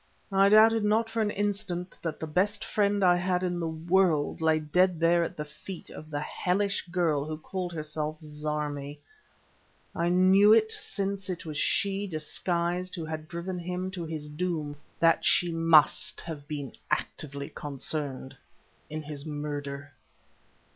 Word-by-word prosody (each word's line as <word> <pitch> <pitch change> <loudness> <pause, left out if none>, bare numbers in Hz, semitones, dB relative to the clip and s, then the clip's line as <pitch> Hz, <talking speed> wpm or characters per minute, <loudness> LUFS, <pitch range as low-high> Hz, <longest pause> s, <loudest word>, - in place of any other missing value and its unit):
I 195 0 +5
doubted 220 +1 +6
not 220 +2 +2
for 225 - 0
an 210 - +1
instant 200 -3 -2
that 160 -3 -4
the - - -3
best 195 +6 0
friend 205 -1 +1
I 175 -1 +6
had 180 0 0
in 175 -1 -1
the 165 - -1
world 165 -1 +1
lay 160 -1 +4
dead 175 +3 +2
there 170 +1 +4
at - - -5
the 150 - -3
feet 160 +5 -9
of 155 - -10
the 145 -1 -3
hellish 195 +5 -1
girl 170 -5 +1
who 155 +1 -5
called 180 +3 -4
herself 155 -1 -4
Zarmi, 150 -1 -4 1.0
and 170 - -2
I 170 - +2
knew 190 +4 +6
since 200 - -3
it 175 -2 -4
was 155 -2 -5
she, 200 0 +1
disguised, 175 +2 -2
who 165 -3 -4
had 155 0 -5
driven 175 +2 -4
him 180 +2 -3
to 180 -2 -5
his 155 -2 -5
doom, 150 -2 -3 0.2
that 165 -1 +4
she 175 -1 +3
must 165 -2 +4
have 150 -4 -7
been 145 -4 -5 0.2
actively 140 -1 -3
concerned 140 -1 -4 0.5
in 155 0 -5
his 145 -1 -6
murder. 145 -2 -5
170 Hz, 155 wpm, -28 LUFS, 150-185 Hz, 1.0 s, doubted